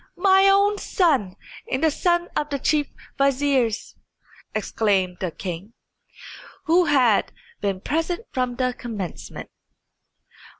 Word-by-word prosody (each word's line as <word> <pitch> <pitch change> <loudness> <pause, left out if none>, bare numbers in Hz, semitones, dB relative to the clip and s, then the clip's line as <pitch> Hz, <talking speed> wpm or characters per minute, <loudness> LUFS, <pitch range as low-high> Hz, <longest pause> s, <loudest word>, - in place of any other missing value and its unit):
"My 385 +1 +5
own 400 +1 +3
son 275 - +1 0.4
and 260 +4 -1
the 320 - +4
son 345 +3 +1
of 295 0 -1
my 280 - 0
chief 295 +1 +1 0.3
vizier!" 275 -3 +3 0.9
exclaimed 195 -4 0
the 185 - -2
king, 185 +5 -7 0.9
who 345 +2 +4
had 255 -9 +3 0.3
been 195 -2 -2
present 330 - -1
from 250 -1 -1
the 255 0 0
commencement. 215 -8 -7
270 Hz, 115 wpm, -23 LUFS, 210-335 Hz, 0.9 s, My